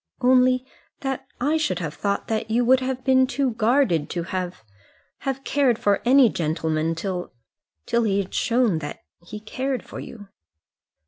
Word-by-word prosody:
"Only 255 0 +4 0.4
that 270 -1 -3
I 295 +5 +1
should 310 -1 0
have 165 -5 -4
thought 200 -1 -2
that 220 0 -2
you 235 +2 +2
would 260 +2 +5
have 260 0 -3
been 260 -1 +4
too 275 -1 0
guarded 220 - +2
to 170 - -3
have 180 -8 -4 0.6
have 270 -1 -3
cared 270 -6 +2
for 205 -2 +1
any 260 +1 +6
gentleman 160 -2 -1
till 180 -1 -4 0.5
till 235 - +1
he 205 -4 +1
had 195 -2 -3
shown 230 -8 +2
that 145 -2 -7 0.2
he 210 +5 -8
cared 255 +5 -3
for - - -9
you." 205 -4 -10
235 Hz, 165 wpm, -23 LUFS, 185-260 Hz, 0.6 s, any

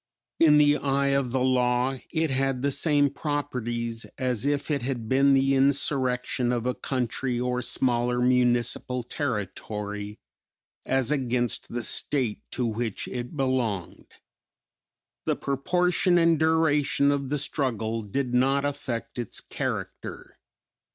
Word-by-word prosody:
In 150 -2 +6
the 145 0 +5
eye 140 -1 +1
of 140 -2 +1
the 130 0 0
law 125 0 +2
it 160 -2 0
had 135 -1 0
the 140 - +2
same 145 0 +2
properties 120 -6 -3
as 130 -1 0
if 145 +1 -1
it 140 -2 0
had 120 -3 -3
been 135 +3 +4
the 135 0 +3
insurrection 130 -2 +1
of 120 -1 -1
a 125 - +1
country 125 -1 -2
or 125 0 -1
smaller 125 -1 0
municipal 125 0 +1
territory 105 - -4 0.7
as 130 0 +1
against 125 -4 -1
the 120 0 -3
State 125 -2 +1
to 125 - -2
which 115 -1 -3
it 125 +4 -6
belonged. 125 - -1 1.2
The - - +1
proportion 175 +6 +1
and 165 -2 +4
duration 155 -3 +3
of 140 -2 -2
the 150 - 0
struggle 115 -6 -1
did 125 +4 -3
not 135 +3 +2
affect 125 -4 -4
its 120 - -4
character. - - -6
130 Hz, 130 wpm, -26 LUFS, 120-140 Hz, 1.2 s, In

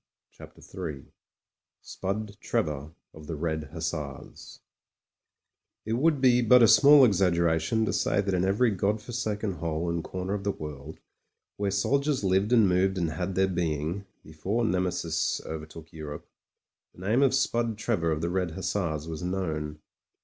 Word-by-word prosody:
CHAPTER - - -14 0.2
III 75 -6 -5 0.8
SPUD 100 +2 -4
TREVOR 75 +1 -2 0.2
OF 75 -1 -12
THE 85 - -4
RED 80 0 -2
HUSSARS 75 -3 -6 1.2
IT 110 - -2
would 145 +4 +2
be 125 -2 +4
but 125 +1 +6
a - - +8
small 140 +3 +8
exaggeration 85 0 +2
to - - -1
say - - +1
that 100 -1 0
in 90 -1 +1
every 105 +5 +2
God 100 +2 0
forsaken 110 -2 -3
hole 80 +1 -2
and 85 -1 -2
comer 95 +1 -4
of 100 -1 -3
the 100 - -1
world, 75 -4 -6 0.6
where 100 -1 0
soldiers 140 +7 0
lived 95 +3 +2
and 115 -5 +5
moved 95 +1 +2
and 85 -3 0
had 90 +4 -3
their 95 0 +3
being, 85 +1 -2 0.2
before 95 +10 -2
Nemesis 90 -4 0
overtook 80 0 -8
Europe, 75 -2 -7 0.7
the - - -14
name 115 +6 +3
of 135 -1 +4
Spud 120 -4 0
Trevor 100 -8 0
of 80 0 -1
the 85 - -1
Red 90 -2 -1
Hussars 85 -5 -2
was 80 -2 -5
known. 80 -5 -3
95 Hz, 155 wpm, -27 LUFS, 80-105 Hz, 1.2 s, a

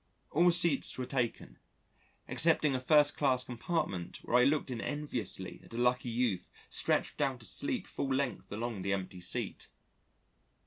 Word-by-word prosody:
All 175 +4 +5
seats 170 -4 +2
were 130 - -2
taken, 120 -3 -2 0.7
excepting 155 -2 +4
a 130 - 0
first 145 +2 +4
class 130 -3 +2
compartment 120 - -3
where 120 - +3
I 125 - +6
looked 140 -1 +1
in 120 - -3
enviously 135 -10 -4
at - - -11
a - - -4
lucky 125 0 +2
youth 115 -5 0 0.2
stretched - - 0
out 130 -4 0
asleep 105 - -1
full 135 - -3
length 135 -1 -1
along 110 -1 -3
the 95 +1 0
empty 95 -1 -4
seat. 90 - -3
125 Hz, 150 wpm, -32 LUFS, 115-145 Hz, 0.7 s, I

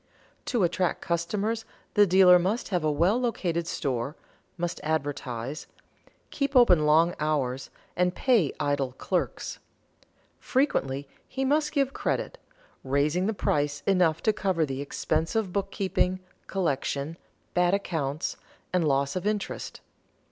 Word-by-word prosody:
To 235 -7 +1
attract 175 +1 0
customers 205 +7 -1 0.3
the 205 -1 +5
dealer 180 0 +7
must 195 +7 -1
have 180 -4 0
a 155 - +2
well 175 +10 +2
located 175 -9 -1
store, 135 -2 -2 0.4
must 175 0 -3
advertise, 145 -4 -3 0.6
keep 280 -1 -2
open 180 -12 +6
long 165 +3 +5
hours, 140 -4 -1 0.3
and 180 0 +1
pay 225 - +3
idle 140 -3 0
clerks. 180 +7 -2 0.8
Frequently 140 - 0 0.2
he 270 0 -2
must 300 +2 +2
give 275 -2 +1
credit, - - -2 0.4
raising 145 +7 +1
the 220 - 0
price 145 -5 0
enough 180 -5 +2
to 215 - +3
cover 190 -5 0
the 135 -1 -4
expense 160 +4 -1
of 210 -5 0
bookkeeping, 190 -2 0 0.3
collection, 150 -4 -1 0.4
bad 180 +1 +3
accounts, 155 -6 -2 0.4
and 175 -3 +2
loss 140 0 +1
of 185 +2 -2
interest. 210 -1 -3
175 Hz, 125 wpm, -27 LUFS, 145-200 Hz, 0.8 s, dealer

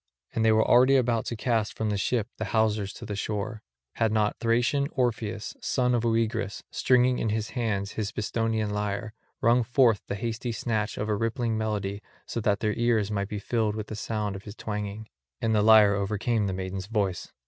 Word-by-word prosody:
And 115 - 0
they 110 - +5
were 110 0 +3
already 130 +3 +6
about 120 -3 +2
to 120 - -2
cast 110 -1 -1
from 110 -1 -1
the 105 - 0
ship 110 +1 0
the 110 - -1
hawsers 105 -2 +1
to - - -9
the 105 - -4
shore, 105 +2 -3 0.4
had 115 -2 +2
not 105 -1 +1
Thracian 120 +5 +2
Orpheus, 115 -4 -2
son 125 -2 +1
of 120 - +2
Oeagrus, 115 -3 0
stringing 125 0 +3
in 110 - 0
his 110 0 -2
hands 105 -5 -1
his 105 -1 -3
Bistonian 110 -1 -1
lyre, 105 +1 -3 0.3
rung 120 +2 +4
forth 120 -2 +3
the - - -2
hasty 115 +2 -3
snatch 110 -2 -2
of 105 - -2
a 105 - +1
rippling 115 +1 -1
melody 105 -2 -2 0.2
so 115 - -3
that 105 -1 +1
their 105 -1 +1
ears 115 -3 +1
might 100 -1 -2
be 105 - -3
filled 110 0 0
with 110 -1 -4
the 110 - -4
sound 105 -1 -3
of 95 - -7
his 105 - -8
twanging; 105 0 -5 0.3
and 115 -2 +1
the 105 - +3
lyre 105 -1 +7
overcame 105 +2 0
the 95 - -2
maidens' 95 0 -4
voice. 100 -5 -1
110 Hz, 200 wpm, -27 LUFS, 105-115 Hz, 0.4 s, lyre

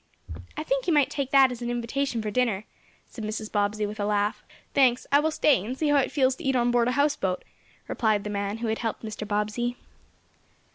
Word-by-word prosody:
"I - - -2
think - - -1
you 340 - +3
might 285 -2 +3
take 280 -3 -2
that 270 -2 +6
as 245 -1 -7
an 240 - -3
invitation 240 0 -2
to 210 - -3
dinner," 220 -3 0 0.4
said 225 - -9
Mrs. 215 0 -4
Bobbsey, 210 0 0
with 210 +1 -6
a 205 - 0
laugh. 205 0 0 0.3
"Thanks, 255 -3 +3
I 285 - +6
will 310 +2 +1
stay, 295 -9 +3
and 250 +5 -5
see 305 0 0
how 290 - +4
it 275 - +1
feels 260 -3 +2
to - - -10
eat 270 -1 +1
on 240 -1 +2
board 240 -1 +3
a 250 - +1
houseboat," 285 -10 0 0.4
replied 215 -3 +1
the 210 - -4
man 200 +1 -2
who 230 0 -3
had 220 - -1
helped 225 -1 -3
Mr. 215 -1 -6
Bobbsey. 215 +4 -1
240 Hz, 225 wpm, -26 LUFS, 210-270 Hz, 0.4 s, that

